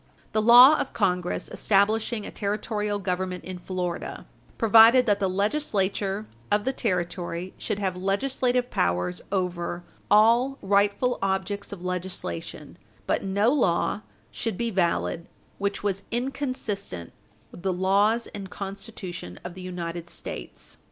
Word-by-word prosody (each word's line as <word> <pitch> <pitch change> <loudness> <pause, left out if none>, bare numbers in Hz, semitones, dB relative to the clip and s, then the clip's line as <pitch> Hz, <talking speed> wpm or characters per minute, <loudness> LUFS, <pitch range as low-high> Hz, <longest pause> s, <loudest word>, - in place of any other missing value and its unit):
The 215 - +1
law 245 +7 +9
of - - -3
Congress 180 -4 0
establishing 215 +2 +1
a - - -7
Territorial 210 0 -2
Government 185 -1 -3
in 185 -1 -7
Florida 180 -1 -4 0.3
provided 230 +2 +7
that 205 -2 +2
the 195 -2 +1
Legislature 200 -2 -1 0.3
of 205 0 +3
the 265 - 0
Territory 180 -4 -2
should 205 - -2
have 190 -3 -1
legislative 245 +6 0
powers 90 +1 0
over 175 -2 -2 0.3
"all 235 +6 +5
rightful 205 +5 +2
objects 195 +1 -2
of 190 -3 -8
legislation, 180 - -5 0.3
but - - 0
no 200 +4 +2
law 170 - +1 0.3
should 225 -5 -3
be 235 -1 -1
valid 170 - 0 0.3
which 200 0 -2
was 195 -1 -1
inconsistent 235 - -3 0.4
with - - -11
the 190 +1 0
laws 200 +5 +2
and 195 -2 -7
Constitution 195 - -7
of 180 - -6
the 185 - -10
United 175 -2 -5
States." 60 - -8
195 Hz, 130 wpm, -26 LUFS, 180-220 Hz, 0.4 s, law